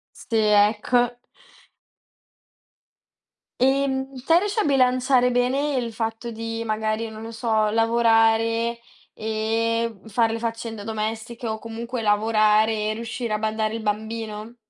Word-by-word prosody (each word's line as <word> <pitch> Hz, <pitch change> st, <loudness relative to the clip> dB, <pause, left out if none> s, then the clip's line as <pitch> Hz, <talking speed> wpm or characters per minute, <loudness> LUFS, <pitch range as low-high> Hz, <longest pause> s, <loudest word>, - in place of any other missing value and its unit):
Sì, 230 Hz, -, -4 dB
ecco. 220 Hz, +3 st, +3 dB, 2.4 s
Ehm, 270 Hz, 0 st, +1 dB
te 330 Hz, +1 st, +6 dB
riesci 415 Hz, +2 st, -2 dB
a -, -, +3 dB
bilanciare 255 Hz, -2 st, +3 dB
bene 265 Hz, +4 st, +1 dB
il 235 Hz, -2 st, -2 dB
fatto 225 Hz, +1 st, -4 dB
di 225 Hz, 0 st, -5 dB
magari, 220 Hz, 0 st, -2 dB
non 215 Hz, -, -9 dB
lo 225 Hz, +1 st, -7 dB
so, 220 Hz, -2 st, 0 dB
lavorare 225 Hz, +1 st, +2 dB, 0.3 s
e, 225 Hz, +1 st, -1 dB
mhmm, -, -, -20 dB
fare 225 Hz, +1 st, +1 dB
le 230 Hz, -, -2 dB
faccende 225 Hz, -2 st, -4 dB
domestiche 220 Hz, +2 st, -4 dB
o 220 Hz, -1 st, -2 dB
comunque 230 Hz, +2 st, -5 dB
lavorare 215 Hz, 0 st, +3 dB, 0.2 s
e 215 Hz, -, -1 dB
riuscire 230 Hz, 0 st, -4 dB
a 215 Hz, -, 0 dB
badare 220 Hz, 0 st, -1 dB
il 230 Hz, -, -4 dB
bambino? 220 Hz, +1 st, -4 dB
225 Hz, 125 wpm, -23 LUFS, 220-240 Hz, 2.4 s, te